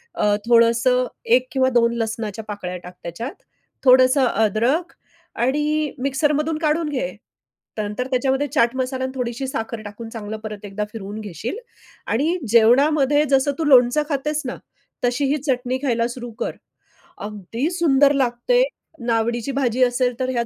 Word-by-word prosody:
अ, 205 0 +2
थोडंसं 235 +2 +4 0.3
1 255 0 +1
किंवा 260 -1 +2
2 235 -1 +3
लसणाच्या 225 -1 -3
पाकळ्या 185 -4 -5
टाक 180 - -10
त्याच्यात, 230 - -5 0.5
थोडंसं 255 +1 +6
अद्रक 230 - +1 0.5
आणि 300 +3 0
मिक्सरमधून 295 +3 0
काढून 310 0 0
घे. - - -2 0.7
नंतर 210 +4 -3
त्याच्यामध्ये 265 +2 +1
चाट 235 -1 +2
मसाला 260 0 -2
आणि 260 - -2
थोडीशी 250 +1 -3
साखर 225 -3 -4
टाकून 225 +2 -8
चांगलं 220 -1 -6
परत 210 -1 -7
एकदा 205 +1 -4
फिरवून 210 -1 -7
घेशील 215 - -5 0.5
आणि 310 +10 +1
जेवणामध्ये 275 +6 +4
जसं 270 +1 +3
तू 325 - +1
लोणचं 260 +1 +5
खातेस 300 +1 -1
ना, 250 - -3 0.5
तशी 250 +4 +1
ही 295 - +2
चटणी 255 0 0
खायला 235 -3 +1
सुरु 240 0 -7
कर. - - -3 0.6
अगदी 210 - -4
सुंदर 290 -5 +4
लागते 265 - +1 0.4
नावडीची 235 +2 0
भाजी 255 -2 +1
असेल 245 0 +1
तर 255 - -1
ह्यात. 240 -2 0
250 Hz, 145 wpm, -21 LUFS, 230-275 Hz, 0.7 s, थोडंसं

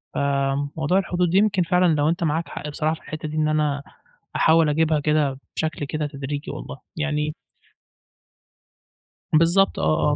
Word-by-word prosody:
آآ، 140 0 0
موضوع 160 +4 +2
الحدود، 180 -2 0
يمكن 200 -3 +3
فعلًا 180 +1 +2
لو 145 +1 +2
أنت 170 +1 -1
معاك 160 +2 0
حق 150 - -6
بصراحة 155 +2 -1
في - - -17
الحتّة 155 0 -6
دي، 155 +1 -5
إن 155 0 +2
أنا 150 -2 0 0.5
أحاول 160 -1 +4
أجيبها 155 0 +2
كده، 145 -3 +1 0.2
بشكل 155 -2 -2
كده 150 +1 -2
تدريجي 140 +1 -5
والله، - - -7 0.2
يعني 150 -1 -1 2.0
بالضبط، 170 +5 +4
آه، 155 -1 +2
آه - - +1
155 Hz, 155 wpm, -23 LUFS, 145-165 Hz, 2.0 s, أحاول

